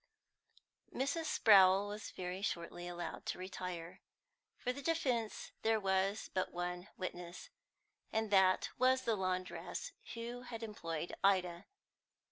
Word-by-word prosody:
Mrs. 285 +5 -1
Sprowl 195 -6 +6
was 210 +1 -5
very 180 +1 -5
shortly 175 -3 -3
allowed 175 0 -5
to - - -1
retire. 180 -1 -5 0.6
For 250 - -1
the 280 - -7
defence 260 -8 0
there 220 0 +3
was 195 +1 +1
but 185 - 0
one 180 +1 -3
witness, 175 -1 -6 0.6
and 220 -1 0
that 190 -1 +5
was 260 +1 +4
the 230 - +2
laundress 185 -1 -2 0.2
who 235 +1 -5
had 235 -2 -7
employed 170 -7 -4
Ida. 185 -2 +2
195 Hz, 120 wpm, -36 LUFS, 180-225 Hz, 0.6 s, Sprowl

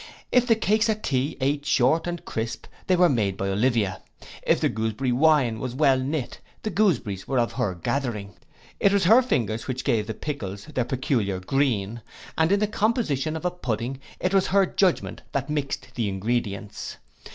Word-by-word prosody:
If 250 -1 +4
the 225 - +5
cakes 220 +1 +2
at 215 -1 -1
tea 135 +2 0
eat 140 +2 0
short 145 +3 +2
and 175 -1 -4
crisp, 115 +1 -4 0.2
they 185 - +4
were 180 0 +5
made 105 - 0
by 95 - -1
Olivia: 105 -1 +1 0.4
if - - +2
the - - +2
gooseberry 110 +4 -1
wine 130 -4 +3
was 125 0 -4
well 135 -2 +4
knit, 135 0 -3 0.2
the 215 - -2
gooseberries 125 - +1
were 135 - 0
of 120 -1 +2
her 110 -8 -1
gathering: 105 0 -3 0.5
it 200 - +4
was 200 -1 +2
her 225 +8 +7
fingers 115 - -1
which 130 -1 -3
gave 105 -2 +1
the 110 - -4
pickles 105 -9 -5
their 125 - -2
peculiar 120 -8 -1
green; 115 -1 0 0.3
and 160 +2 +2
in 200 - +4
the 210 - +3
composition 205 - 0
of 160 - -5
a 180 - +2
pudding, 125 -5 -3 0.2
it 185 +1 0
was 195 -1 +3
her 195 0 +4
judgment 185 -1 0
that 140 +2 -2
mix'd 140 -3 -3
the 115 -5 -1
ingredients. 105 0 -3
130 Hz, 185 wpm, -25 LUFS, 110-170 Hz, 0.5 s, her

